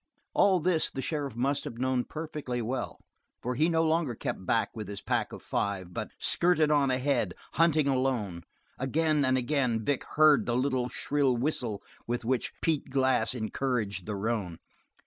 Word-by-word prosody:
All 195 -2 +4
this 165 -1 +1
the - - -7
sheriff 140 -3 -3
must 135 +4 0
have 115 - -7
known 130 0 0
perfectly 150 -5 -4
well, 125 +3 -3 0.4
for 125 - -1
he 155 +7 +2
no 165 -1 +2
longer 160 -6 +1
kept 95 - -4
back 115 - +2
with 110 -3 -5
his 100 0 -6
pack - - -1
of - - -9
five, 95 -3 -2
but - - -4
skirted 160 -3 +3
on 145 -2 +3
ahead, 130 +2 +1 0.2
hunting 160 -3 +3
alone. 130 -10 0 0.4
Again 150 +3 +1
and 130 -1 +3
again 125 -4 0
Vic 140 -2 0
heard 155 -2 +5
the 120 0 +1
little 130 -1 0
shrill 140 -3 +1
whistle 120 -6 -2 0.2
with 120 0 -2
which 125 0 0
Pete 155 -4 0
Glass 130 -3 +2
encouraged 110 -4 -2
the 105 - -2
roan. 100 -5 -2
130 Hz, 165 wpm, -29 LUFS, 115-150 Hz, 0.4 s, heard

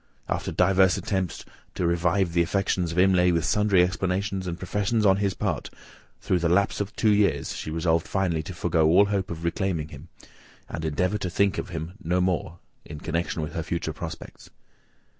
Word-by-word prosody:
After - - -2
divers 95 -2 +3
attempts 95 -3 -3 0.3
to 90 - -1
revive 85 +1 +1
the 85 - +3
affections 90 -1 0
of 85 - -6
Imlay, 90 -1 +4
with 85 -2 +1
sundry 105 -4 +3
explanations 95 +1 -1
and 85 -1 -3
professions 105 +4 0
on 95 -1 +5
his 100 -1 0
part, - - -2 0.5
through 90 - +1
the 85 0 +1
lapse 100 +3 +2
of 100 +2 -5
two 110 - +3
years, 105 -1 +1
she - - -5
resolved 80 +1 0
finally 90 -5 0
to 85 +3 -8
forgo 85 -2 +2
all 90 +6 +6
hope 100 -2 -1
of 85 0 -6
reclaiming 85 -3 -1
him, 75 +3 -11 0.6
and 80 - -6
endeavour 90 +7 0
to 90 - -3
think 100 +2 +1
of - - -5
him 80 0 -5
no 90 +2 +1
more 90 -2 -1 0.3
in 75 -1 -9
connexion 85 +1 -2
with 75 - -5
her 85 - -2
future 85 +1 -3
prospects. - - -8
90 Hz, 185 wpm, -25 LUFS, 85-95 Hz, 0.6 s, all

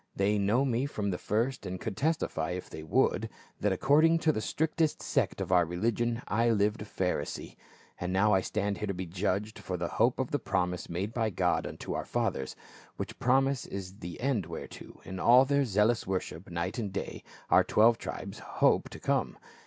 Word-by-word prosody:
They 100 +2 +2
know 110 +7 +2
me 130 +1 0
from 105 -7 -2
the 90 - -3
first 115 +5 -1
and 95 -1 -5
could 110 -1 -4
testify, 135 - 0
if 90 - -6
they - - -7
would, 80 - +1 0.3
that 105 - +1
according 150 - +4
to 155 - +6
the 110 - -2
strictest 160 +4 0
sect - - 0
of - - -3
our 90 -1 +6
religion, 115 +7 -1
I 115 +3 +2
lived 105 0 +2
a - - -5
Pharisee. 95 -3 -3 0.4
And 90 +1 -2
now 105 +3 +3
I 95 - +4
stand 100 +1 -2
here 105 - -2
to 100 - -2
be 90 +1 -4
judged 100 +4 -2
for 95 -2 -4
the 85 0 -2
hope - - +2
of - - -1
the - - +1
promise 90 0 -1
made 95 +6 -3
by 115 -2 +1
God 95 - 0
unto - - -6
our - - -3
fathers. 65 - -2 0.4
Which - - -6
promise 135 +1 +2
is 95 +1 -7
the 85 0 -7
end 120 - 0
whereto, 85 - -9
in 95 0 -6
all 125 +6 +7
their 140 0 +2
zealous 105 +1 +2
worship 95 -2 -3
night 85 +5 -3
and 105 -4 -3
day, 95 - -5 0.3
our - - +7
twelve 115 +2 +4
tribes - - -6
hope - - +2
to - - -10
come. - - 0
105 Hz, 200 wpm, -30 LUFS, 90-120 Hz, 0.4 s, all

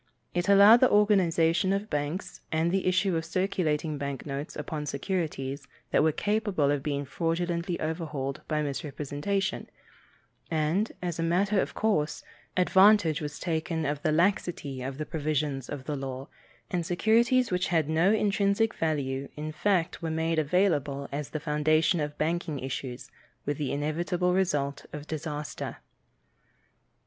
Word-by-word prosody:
It 175 +2 0
allowed 200 +3 +9
the 255 - +5
organization 185 -4 +3
of 200 +2 -1
banks 150 +4 -3
and 160 +2 +1
the 190 0 0
issue 185 0 +2
of 160 - 0
circulating 160 -4 -1
bank 140 -2 -4
notes 140 +1 -5
upon 150 0 -4
securities 140 -3 -3 0.2
that - - +4
were 160 +1 +4
capable 205 -6 +1
of 145 -1 0
being 145 0 -2
fraudulently 170 +3 -1
overvalued 155 -4 -3
by 155 -1 0
misrepresentation, 150 +6 -3 0.8
and, 165 +7 +1
as 175 -2 -3
a - - +1
matter 190 +4 +2
of - - -4
course, 200 -9 0 0.3
advantage 190 -3 +5
was 150 0 -5
taken 160 -1 -2
of 145 0 -2
the 155 - +1
laxity 165 -5 0
of 135 +1 -5
the 155 - -3
provisions 150 -4 -2
of 145 -3 -5
the 150 +2 -3
law, 135 0 -5 0.4
and 180 -3 0
securities 230 +7 +3
which 180 0 +1
had 165 -4 +1
no 165 +5 +3
intrinsic 210 +1 +2
value 140 -4 -2
in 155 +1 -4
fact 175 +1 0
were 165 - -2
made 160 0 0
available 150 -4 +1
as 145 0 -4
the 155 - -4
foundation 155 +3 +2
of 150 -1 -3
bank 170 +3 -1
issues, 135 -3 -5 0.3
with 145 0 -2
the 145 -3 -1
inevitable 170 +5 0
result 145 -7 0
of 150 -1 -6
disaster. 150 -1 -5
160 Hz, 145 wpm, -28 LUFS, 145-185 Hz, 0.8 s, allowed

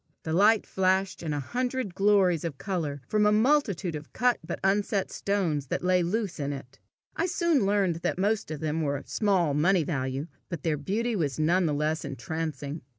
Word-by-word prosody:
The 160 - -3
light 210 +5 +4
flashed 190 0 0
in 160 -2 -3
a 145 - -1
hundred 250 - -2
glories 195 -4 +3
of 160 -5 -4
colour 155 -8 -3
from 210 -1 +3
a - - +4
multitude 215 - +2
of 150 0 -8
cut 245 -1 +2
but 170 - -5
unset 200 0 +1
stones 170 -9 -1
that - - -2
lay 180 0 +3
loose 185 0 -2
in 140 0 -2
it. 140 -1 -9 0.4
I 340 - 0
soon 335 - +2
learned 195 -4 +2
that 170 - -2
most 205 0 0
of 155 -2 -5
them 160 +1 -1
were 145 -2 0
of - - -11
small 190 -8 +1
money 170 +4 +3
value, 135 -2 -2 0.2
but 170 -5 -5
their 160 -3 +1
beauty 220 +11 -1
was 145 -8 -1
none 170 +3 +2
the 150 - 0
less 155 +2 -1
entrancing. 145 +2 -4
175 Hz, 195 wpm, -27 LUFS, 150-205 Hz, 0.4 s, light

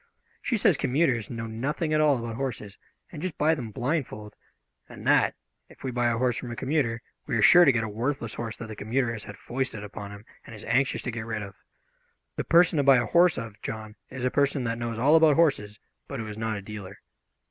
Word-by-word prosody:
She 235 - 0
says 190 -6 +3
commuters 130 -4 +1
know 115 -2 -5
nothing 140 +8 -2
at 155 - +3
all 150 -3 +4
about 115 -1 -5
horses 115 -6 -5 0.4
and 150 - -8
just 185 -3 -4
buy 155 +2 +3
them 125 -8 -4
blindfold, 120 -4 -3 0.5
and - - -11
that, - - +4 0.3
if - - -17
we 130 - -2
buy 120 0 +1
a 115 - 0
horse 125 -1 +1
from 125 - -6
a 120 - -5
commuter, 130 -4 -1 0.2
we 125 -5 0
are - - +1
sure 175 0 +8
to 140 - +6
get 115 -2 0
a - - -2
worthless 115 +2 -3
horse 115 -2 -5
that 115 - -7
the 110 - -8
commuter 120 +3 -1
has 110 -2 -6
had 105 - -9
foisted 125 -4 -4
upon 100 0 -8
him 100 +1 -11 0.2
and 115 - -11
is 105 - -10
anxious 130 +4 +1
to 120 - -3
get 115 0 -6
rid 110 -2 -3
of. 100 -1 -9 0.8
The - - -2
person 170 0 +4
to 145 - +3
buy 135 -1 +6
a 120 - +1
horse 175 +3 +4
of, 110 -2 -7
John, 110 -1 -6
is 130 -1 -5
a 125 - +1
person 140 -1 +1
that 115 0 -2
knows 120 -1 -3
all 140 +7 +4
about 160 -2 +6
horses, 120 -11 +1 0.3
but 140 - -5
who 110 - -4
is 105 -1 -7
not 110 0 -2
a 100 - -7
dealer." 100 -2 -8
120 Hz, 235 wpm, -27 LUFS, 110-140 Hz, 0.8 s, sure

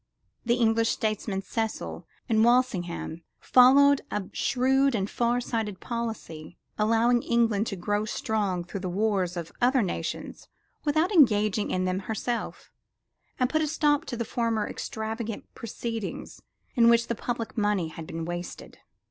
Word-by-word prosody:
The 235 0 +2
English 225 -1 +2
statesmen 215 -3 -2
Cecil 220 +2 -4 0.2
and 220 -2 +3
Walsingham 195 -9 +1 0.2
followed 275 +3 +6
a 210 - -2
shrewd 265 +1 +2
and 195 -2 0
far 240 +2 0
sighted 220 -5 -3
policy, 220 -9 -5 0.2
allowing 230 +3 +3
England 230 -3 +1
to 195 - -3
grow 205 +4 -1
strong 205 -5 -1
through 180 +3 -6
the 185 -1 -4
wars 190 -2 0
of 170 -1 -5
other 250 0 +4
nations 185 - -5 0.4
without 310 +5 +2
engaging 215 - +4
in 185 0 0
them 185 +1 0
herself, 220 +4 -4 0.7
and 255 - +3
put 315 +4 0
a 310 - +1
stop 295 -1 +1
to 240 - -5
the 235 - -2
former 225 -2 -1
extravagant 220 0 -5
proceedings 230 -1 -6 0.3
in 235 -1 +5
which 235 0 +4
the 235 - -2
public 235 0 -4
money 205 -6 +1
had 160 0 -9
been 165 0 -5
wasted. 175 +1 -7
225 Hz, 145 wpm, -27 LUFS, 195-240 Hz, 0.7 s, followed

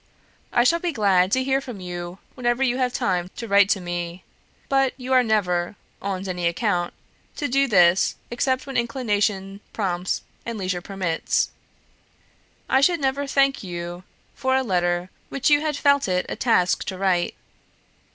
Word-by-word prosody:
I 240 - +4
shall 335 +7 +3
be 350 0 -1
glad 195 - +3
to 260 +3 +2
hear 270 +1 +1
from 245 -6 -8
you 175 0 -6 0.2
whenever 240 +1 0
you 250 -1 +1
have 250 -1 +1
time 180 -9 -1
to 230 - -6
write 200 -1 +5
to 200 - +2
me, 175 0 -5 0.4
but 270 -1 +2
you 260 0 -3
are 255 - +6
never, 195 -6 0 0.3
on 195 -1 -3
any 180 -2 -1
account, 175 -1 -1 0.4
to 290 - -2
do 275 +2 +2
this 180 -4 +4 0.2
except 260 +2 0
when 270 - -3
inclination 210 -5 -1
prompts 185 -3 -1 0.2
and 230 -1 -5
leisure 185 -2 -2
permits. 185 -4 -1 1.2
I 265 - +3
should 340 +4 +3
never 275 +1 -1
thank 275 0 +2
you 175 -1 -6 0.3
for 260 0 0
a 265 - +2
letter 175 -3 0 0.2
which 275 +2 +1
you 290 0 +5
had 305 -2 -1
felt 280 -3 +3
it 180 -1 0
a - - -4
task 180 -7 +2
to 190 - -4
write." 185 -2 +1
205 Hz, 165 wpm, -23 LUFS, 180-260 Hz, 1.2 s, are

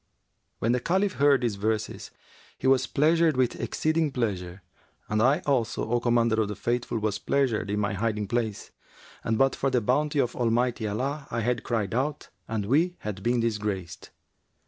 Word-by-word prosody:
When 115 - 0
the 125 - +2
Caliph 190 +8 0
heard 140 -1 +5
these 115 -5 -1
verses, 110 +1 -2 0.5
he - - -8
was 130 0 +4
pleasured 160 0 +3
with 125 -2 +1
exceeding 155 -1 0
pleasure, 95 -7 -3 0.4
and 105 +1 0
I 135 +5 +3
also, 130 -7 0
O 120 - +3
Commander 115 -2 +2
of 105 - 0
the 105 - -4
Faithful, 120 +2 -1
was 105 -2 -1
pleasured 125 -7 0
in 105 +1 0
my 100 -1 0
hiding 105 0 -1
place, 110 -2 -2 0.5
and 110 -1 0
but 135 +2 +3
for 135 - 0
the 130 -2 +2
bounty 145 +7 0
of 125 -3 +1
Almighty 120 -1 +1
Allah, 135 +8 -3
I 115 - -2
had 120 +1 0
cried 110 -4 -2
out 140 +5 -2 0.2
and 110 -3 -2
we 160 - +2
had 105 -2 -5
been 120 +3 +1
disgraced. 105 -6 -3
120 Hz, 175 wpm, -27 LUFS, 105-135 Hz, 0.5 s, heard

